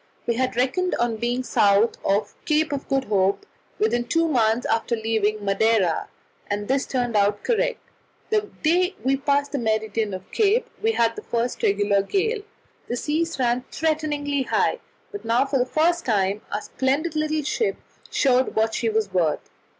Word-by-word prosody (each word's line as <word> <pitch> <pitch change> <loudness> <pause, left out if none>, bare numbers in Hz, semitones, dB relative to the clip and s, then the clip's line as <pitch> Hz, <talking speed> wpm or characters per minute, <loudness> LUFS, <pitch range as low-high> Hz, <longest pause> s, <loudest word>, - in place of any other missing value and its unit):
We 235 - +1
had 255 +1 -1
reckoned 265 +9 +1
on 235 -2 0
being 240 +3 -1
south 205 -1 +3
of 205 +1 +1
the - - -35
Cape 310 -1 +1
of 280 - -4
Good 270 -1 +1
Hope 200 - +1 0.3
within 240 - +1
two 330 +6 +2
months 235 -4 +2
after 225 +1 0
leaving 215 -2 -1
Madeira, 195 -3 +2 0.4
and 205 0 -2
this 270 +1 0
turned 245 -3 -1
out 205 0 +2
correct. - - +1 0.5
The 425 -1 +1
day 360 +4 +2
we 270 +1 +2
passed 285 +1 0
the 285 - -2
meridian 220 -2 -1
of 185 - -8
the - - -16
Cape 440 +2 +3
we 450 +1 +2
had 230 - +2
the - - -6
first 235 +1 -2
regular 200 0 +2
gale; 410 - -1 0.5
the 240 - -2
seas 320 +5 -1
ran 250 -1 +1
threateningly 295 -3 -1
high, 230 -4 +1 0.3
but 410 - -7
now 230 +4 +2
for 270 -1 0
the 250 - +1
first 340 +4 +1
time 205 -2 0
our 210 - -2
splendid 285 +8 -1
little 310 0 0
ship 435 - 0 0.3
showed 255 -2 +2
what 220 0 +1
she 230 - 0
was 215 -3 -1
worth. 170 -4 0
245 Hz, 175 wpm, -23 LUFS, 220-305 Hz, 0.5 s, south